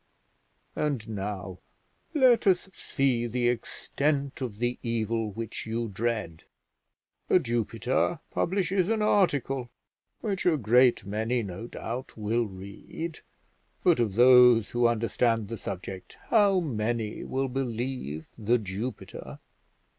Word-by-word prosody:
And 140 -7 -1
now 100 -3 -5 0.6
let 255 -7 +5
us 190 0 +2
see 130 -7 0
the 120 +1 0
extent 140 +4 -1
of 120 -6 -4
the 120 +2 -1
evil 115 -1 -1
which 110 +2 -6
you 115 0 -2
dread. 105 -5 -3 0.8
The - - +5
Jupiter 120 - 0
publishes 185 0 0
an 220 -1 +1
article 140 - +1 0.5
which 200 -4 -2
a 165 -3 +4
great 125 +1 +4
many, 110 +4 -1
no 100 +3 -6
doubt, 120 +2 -6
will 110 +2 0
read; 100 - -7 0.6
but 175 -6 +4
of 110 -5 0
those 125 -2 +7
who 120 0 +3
understand 115 -1 +1
the 115 - -4
subject 95 0 -7
how 205 -4 +5
many 115 -7 -2
will 135 +1 -1
believe 125 - -3
The 115 +3 +3
Jupiter? 105 +4 -6
120 Hz, 115 wpm, -28 LUFS, 110-135 Hz, 0.8 s, those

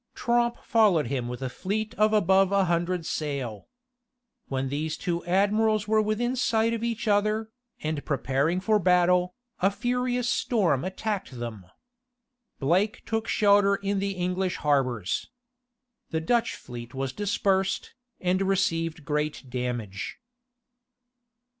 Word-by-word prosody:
Tromp 240 0 +1
followed 205 - +3
him 130 -3 -2
with 125 +2 -5
a - - -1
fleet 210 +9 -3
of 215 0 +3
above 195 -2 +4
a 200 -1 +3
hundred 175 0 0
sail. 135 -10 -3 0.8
When 135 0 -2
these 150 +3 -2
two 175 -2 -2
admirals 210 +3 +2
were 215 0 +3
within 225 +4 0
sight 230 -2 +2
of 230 0 -3
each 235 0 -2
other, 215 +2 +1 0.3
and 155 -2 -2
preparing 140 +5 0
for 215 +2 +3
battle, 180 0 +3 0.2
a 195 - +4
furious 245 +3 -1
storm 185 - +1
attacked 190 - -3
them. 110 -6 -6 0.9
Blake 185 - +1
took 225 0 -2
shelter 200 -1 +4
in 200 0 -1
the 200 0 -1
English 180 0 -1
harbors. 130 -9 0 0.8
The 160 - -1
Dutch 230 +9 +1
fleet 120 0 -9
was 135 -1 -2
dispersed, 195 0 0 0.3
and 185 +1 +1
received 165 -5 0
great 150 -3 -2
damage. 120 -6 -4
185 Hz, 130 wpm, -27 LUFS, 150-215 Hz, 0.9 s, above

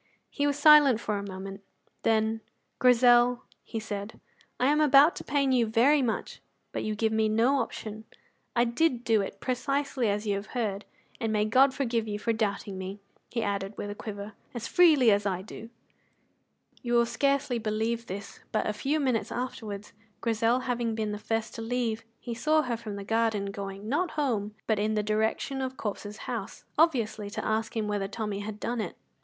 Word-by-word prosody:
He 285 0 0
was 285 0 0
silent 290 -5 +7
for 210 -3 -2
a - - -5
moment. 195 0 -7 0.4
Then, 220 0 +1 0.4
"Grizel," 245 0 +5 0.2
he 225 - -5
said, 210 0 -6 0.4
"I 250 - +2
am 300 +3 +4
about 290 +2 +6
to - - -6
pain 275 -1 +1
you 240 -3 +3
very 255 +7 +4
much, 235 -4 -2 0.3
but - - -3
you 215 0 -2
give 220 +1 +1
me 220 0 +2
no 235 +6 +3
option. 220 -2 -5 0.5
I 235 - +4
did 245 +1 +1
do 225 -3 +3
it 195 0 -6
precisely 270 -1 -1
as 205 +2 -1
you 205 - +1
have 200 +5 -5
heard. 210 -4 -2 0.3
And 225 -1 -1
may 210 -1 +2
God 260 +5 +5
forgive 230 -4 -1
you 205 -1 -2
for 230 +2 0
doubting 200 -3 -2
me," 190 +2 -6 0.3
he 230 - -2
added 200 0 -3
with 205 - -4
a - - -3
quiver, 205 0 -7 0.2
"as 235 -1 -4
freely 305 -10 +6
as 205 0 +2
I 185 -1 -2
do." 225 +2 -10 1.1
You 240 -1 -2
will 235 0 +5
scarcely 275 -1 +1
believe 225 +2 -1
this, 200 +2 -7
but 215 - 0
a 215 - 0
few 280 +8 0
minutes 255 -6 0
afterwards, 215 -5 -5 0.3
Grizel 230 +2 +1
having 240 -3 -1
been 215 -1 -2
the 210 - -4
first 225 +1 -2
to 225 - -6
leave, 230 -1 -1 0.2
he 240 - -5
saw 310 +6 +2
her 245 -2 -1
from 220 -3 -6
the 200 - -6
garden 220 -2 0
going, 195 +1 -6
not 315 +8 +1
home, 215 -8 -1
but 220 -2 +1
in 215 +1 0
the 210 - +1
direction 220 +5 0
of 260 0 -4
Corp's 210 0 -5
house, - - -6
obviously 235 -10 +2
to 205 - -5
ask 220 +1 -1
him 215 -1 0
whether 205 -1 -1
Tommy 210 -1 -4
had 210 +1 -6
done 235 +1 -2
it. - - -5
225 Hz, 190 wpm, -28 LUFS, 210-250 Hz, 1.1 s, silent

